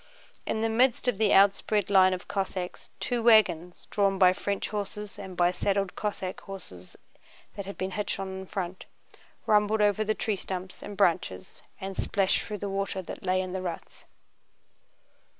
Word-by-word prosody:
In 220 - -1
the 225 - +2
midst 245 +2 +2
of 230 -5 +1
the 215 -2 +3
outspread 200 +1 +4
line 190 -1 +6
of 185 +1 -4
Cossacks 190 -2 -4
two 245 -2 -1
wagons, 180 -7 +4
drawn 195 -1 +2
by 185 -1 +6
French 200 +1 -2
horses 210 0 -5
and 190 -3 -8
by 175 0 +4
saddled 195 +1 -1
Cossack 195 -3 -3
horses 95 - -11 0.6
that 200 -1 -6
had 200 - -7
been 190 +1 -3
hitched 205 +1 -2
on 195 0 -3
in 190 - -7
front, 185 -2 -5 0.6
rumbled 210 +1 +3
over 210 0 +3
the 215 0 0
tree 215 -3 -1
stumps 185 0 -6
and 205 - -8
branches 165 - 0 0.2
and 195 0 -5
splashed 195 0 +1
through 210 - -5
the 205 - -4
water 195 -1 -2
that - - -8
lay 185 0 +1
in 185 -1 -5
the 190 - -2
ruts. 175 -3 -7
195 Hz, 170 wpm, -28 LUFS, 185-210 Hz, 0.6 s, line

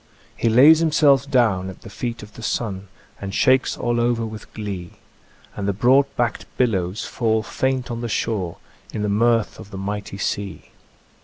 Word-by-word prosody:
He 115 - +1
lays 140 +8 +7
himself 145 -4 +3
down 110 -9 +2
at 95 - -11
the - - -9
feet 115 +2 -4
of 105 0 -12
the 115 - -11
sun, 100 -4 -3 0.3
And 100 0 -5
shakes 130 -1 +3
all 120 0 0
over 120 -1 +1
with 110 -1 -9
glee, 100 -5 -5 0.6
And 100 -1 -3
the 100 - +1
broad 130 +7 +4
backed 120 -2 -1
billows 100 -4 0
fall 110 -2 0
faint 130 +2 -1
on 115 0 -4
the 120 - -3
shore 95 -6 -2 0.3
In 105 - -3
the 105 - 0
mirth 115 +2 +2
of 110 -2 -10
the 95 - -8
mighty 100 0 -4
sea. 100 -2 -4
110 Hz, 175 wpm, -22 LUFS, 100-120 Hz, 0.6 s, lays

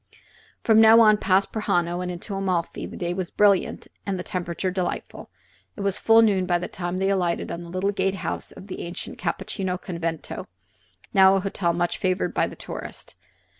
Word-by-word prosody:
From 220 -1 +6
now 225 +1 +8
on, 215 -1 +6
past 195 -1 +2
Prajano 175 -5 0
and 180 - -3
into 180 +4 -7
Amalfi, 185 -3 -2
the - - -9
day 175 -1 -2
was 180 -1 -3
brilliant 200 -2 +2 0.2
and 195 -2 -2
the 180 - -4
temperature 180 +1 -3
delightful. 185 -1 -4 0.5
It - - -7
was 200 0 0
full 225 0 +6
noon 195 -4 +2
by 175 -1 +3
the 175 - -4
time 175 0 -4
they 195 +1 +1
alighted 180 -3 0
at 170 - -4
the 170 - -9
little 185 +3 0
gate 195 -1 0
house - - -4
of 190 - -12
the 195 - -7
ancient 175 +1 -7
Cappuccini 185 -2 -3
Convento, 170 -3 -5 0.7
now 190 -1 +7
a - - +2
hotel 190 -2 0
much 175 0 -1
favored 185 -1 0
by - - +1
the - - -9
tourist. - - -8
185 Hz, 190 wpm, -24 LUFS, 175-195 Hz, 0.7 s, now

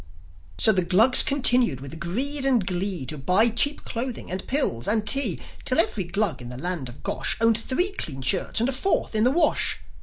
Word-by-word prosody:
So 220 - +5
the 190 -3 0
Glugs 195 +9 +6
continued, 250 - +1
with 140 +4 -10
greed 265 - -3
and 250 -7 +1
glee, 180 -4 -3
To 155 +2 -5
buy 185 - +3
cheap 285 +6 +1
clothing, 240 -3 -6
and 185 +1 -6
pills, 185 - -1
and 215 0 0
tea; 240 - +3 0.2
Till 255 - 0
every 220 - +1
Glug 195 -3 -2
in 120 - -9
the 125 - -8
land 170 -4 -4
of 120 - -15
Gosh - - -2
Owned 230 0 +2
three 350 - 0
clean 135 - -4
shirts 185 - 0
and 235 - 0
a - - -1
fourth 325 +4 -1
in 215 +1 +2
the - - +4
wash. 335 +5 0
215 Hz, 205 wpm, -23 LUFS, 175-255 Hz, 0.2 s, Glugs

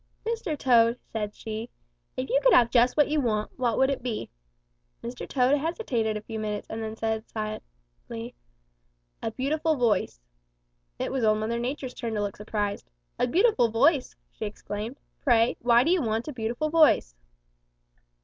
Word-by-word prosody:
'Mr. 445 -9 -2
Toad,' 235 -3 +4 0.2
said 210 -2 -3
she, 220 +2 -6 0.5
'if 130 - -2
you 275 - +3
could - - +5
have 235 -1 +5
just 245 +2 +4
what 295 - +5
you 300 0 +1
want, 215 -4 -1
what 240 -3 +1
would 265 +1 +3
it 275 - -3
be?' 235 -3 -4 0.7
"Mr. 245 +1 -6
Toad 265 +2 +3
hesitated 260 - -1
a - - -6
few 220 0 -6
minutes 210 -1 -3
and 220 +1 -4
then 220 0 -4
said 220 -1 -2
shyly, - - -7 0.9
'A 225 - -2
beautiful 310 +4 +1
voice.' 230 - +1 0.8
"It - - -3
was 265 -2 -1
Old 215 -1 +4
Mother 225 +2 -2
Nature's 255 +1 -4
turn 230 -2 -4
to 210 - 0
look 200 -1 -3
surprised. 205 - -3 0.3
'A - - +2
beautiful 345 - +3
voice!' 260 +5 +2 0.2
she - - -6
exclaimed. 210 +4 -6 0.2
'Pray, 235 -2 +3
why 235 0 +5
do 325 - +2
you 365 -2 +3
want 225 +1 -1
a 300 - -4
beautiful 240 +6 -2
voice?' 310 - +4
235 Hz, 170 wpm, -27 LUFS, 215-270 Hz, 0.9 s, could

